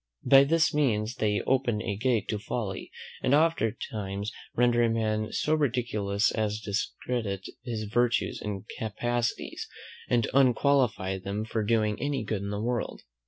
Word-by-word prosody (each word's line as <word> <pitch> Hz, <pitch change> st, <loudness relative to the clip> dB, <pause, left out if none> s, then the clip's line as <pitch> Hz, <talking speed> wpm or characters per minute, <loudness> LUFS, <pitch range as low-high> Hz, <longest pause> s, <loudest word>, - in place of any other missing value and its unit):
By 135 Hz, 0 st, +8 dB
this 165 Hz, +3 st, +3 dB
means 115 Hz, -7 st, +1 dB
they 105 Hz, -1 st, +1 dB
open 125 Hz, -4 st, +1 dB
a 100 Hz, -, -2 dB
gate 115 Hz, +1 st, +1 dB
to 105 Hz, -, -1 dB
folly, 105 Hz, -2 st, -4 dB, 0.3 s
and 140 Hz, -, +3 dB
oftentimes 110 Hz, -9 st, 0 dB, 0.2 s
render 120 Hz, 0 st, +3 dB
a 115 Hz, -, +4 dB
man 110 Hz, -1 st, 0 dB
so 155 Hz, -, 0 dB
ridiculous, 115 Hz, -8 st, +1 dB
as 105 Hz, -1 st, -1 dB
discredit 105 Hz, -1 st, -3 dB, 0.2 s
his 115 Hz, -3 st, -3 dB
virtues 120 Hz, +3 st, +1 dB
and 100 Hz, -1 st, -4 dB
capacities, 120 Hz, +2 st, -2 dB, 0.4 s
and 120 Hz, -2 st, +2 dB
unqualify 125 Hz, -7 st, +3 dB
them 100 Hz, +3 st, -3 dB
from 110 Hz, -1 st, -2 dB
doing 110 Hz, -2 st, +1 dB
any 140 Hz, -4 st, -1 dB
good 105 Hz, -2 st, -2 dB
in 100 Hz, -, -4 dB
the 100 Hz, 0 st, -3 dB
world. 120 Hz, +2 st, -2 dB
110 Hz, 145 wpm, -28 LUFS, 105-125 Hz, 0.4 s, By